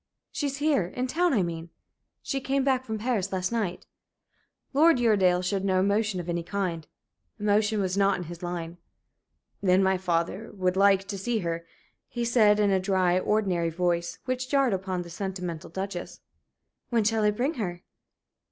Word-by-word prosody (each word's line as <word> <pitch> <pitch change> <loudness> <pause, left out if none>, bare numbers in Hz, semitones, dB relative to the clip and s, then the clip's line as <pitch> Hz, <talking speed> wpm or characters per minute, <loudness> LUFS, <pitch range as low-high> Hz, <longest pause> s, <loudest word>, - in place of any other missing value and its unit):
"She's 280 -2 -2
here 290 - +2
in 250 +7 -3
town, 345 +7 +1
I 210 -8 +2
mean. 165 -1 -5 0.5
She 270 -1 -2
came 275 +1 0
back 260 -1 +1
from 220 -2 -3
Paris 215 -4 -1
last 185 +1 -1
night." 210 -6 -2 0.9
Lord 320 +2 +5
Uredale 190 -6 +3
showed 195 +1 -1
no 190 -1 +2
emotion 200 0 +1
of 175 - -6
any 170 0 -1
kind. 175 -3 -3 0.5
Emotion 210 +1 +2
was 190 -2 0
not 200 0 +3
in 180 - -5
his 175 0 -9
line. 175 -1 -5 0.8
"Then 190 -1 +4
my 190 -1 +2
father 180 +4 -1
would 185 -1 0
like 195 0 +4
to 200 -2 -4
see 235 +4 -1
her," 170 0 -3 0.4
he 240 -1 -3
said, 215 -3 +4
in 205 -1 +3
a 190 - +3
dry, 185 -2 +2
ordinary 185 -5 +1
voice, 170 0 -1
which 255 0 -2
jarred 275 -5 +3
upon 185 -1 -2
the 170 - -11
sentimental 180 -3 -5
Duchess. 190 -2 -5 0.7
"When 230 -3 +2
shall 220 +1 +1
I 210 - +4
bring 245 +9 0
her?" 175 -3 -4
195 Hz, 170 wpm, -27 LUFS, 180-225 Hz, 0.9 s, Lord